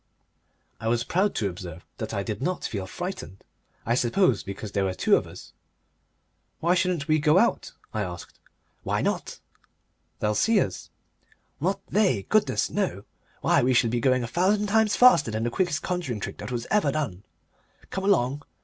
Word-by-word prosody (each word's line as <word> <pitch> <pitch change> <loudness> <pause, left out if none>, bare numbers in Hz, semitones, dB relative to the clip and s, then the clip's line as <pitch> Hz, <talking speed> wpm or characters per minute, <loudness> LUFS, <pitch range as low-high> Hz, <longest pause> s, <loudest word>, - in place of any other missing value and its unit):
I 110 - -4
was 115 +1 +1
proud 190 +10 +1
to 105 - 0
observe 90 -3 -8
that - - -4
I 100 - -2
did 105 +1 -4
not 180 +6 -2
feel 100 -4 -4
frightened 175 - -6 0.4
I 115 - +1
suppose 125 - +2
because 100 +2 -7
there 100 -2 0
were 95 -1 -2
two - - +4
of - - -1
us. - - -12 1.1
"Why 170 +2 +2
shouldn't 180 -4 0
we 155 0 +3
go 150 +3 +4
out?" 235 +5 +1 0.2
I 110 - -1
asked. 90 -3 -7 0.4
"Why - - -1
not?" - - -2 0.8
"They'll 105 0 +1
see 220 - +3
us." 95 - -3 0.7
"Not 190 +5 -1
they. 190 - +2
Goodness, 130 - +2
no! - - -1 0.4
Why, - - +3
we 125 +1 +2
shall 115 -2 +3
be 120 - 0
going 130 0 +2
a - - -3
thousand 190 - +2
times 220 0 +2
faster 210 - +6
than 110 +1 -2
the 120 - -1
quickest 165 0 0
conjuring 170 -11 -2
trick - - -6
that - - -6
was 120 -1 -3
ever 205 -10 +3
done. 125 -12 -3 0.7
Come 190 0 -3
along! 145 -8 +2
130 Hz, 175 wpm, -26 LUFS, -, 1.1 s, faster